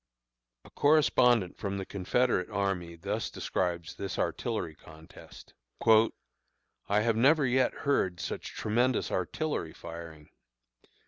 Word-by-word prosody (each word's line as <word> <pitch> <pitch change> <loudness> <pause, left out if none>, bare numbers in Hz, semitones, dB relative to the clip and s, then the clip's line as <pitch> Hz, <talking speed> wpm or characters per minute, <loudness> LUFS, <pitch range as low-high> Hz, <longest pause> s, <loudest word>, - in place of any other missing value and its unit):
A - - -15
correspondent 125 - +3
from 100 -1 -3
the 95 - -4
Confederate 100 +1 0
army 95 -5 -2
thus 100 +6 -3
describes 85 -2 -2
this 100 -2 -4
artillery 100 -9 -2
contest: 80 0 -15 0.3
"I 110 -2 0
have 115 0 +1
never 140 +6 +4
yet 130 0 +2
heard 95 -11 +1
such - - -4
tremendous 120 +3 +1
artillery 95 - -2
firing. 85 -2 -10
100 Hz, 110 wpm, -30 LUFS, 85-125 Hz, 0.3 s, never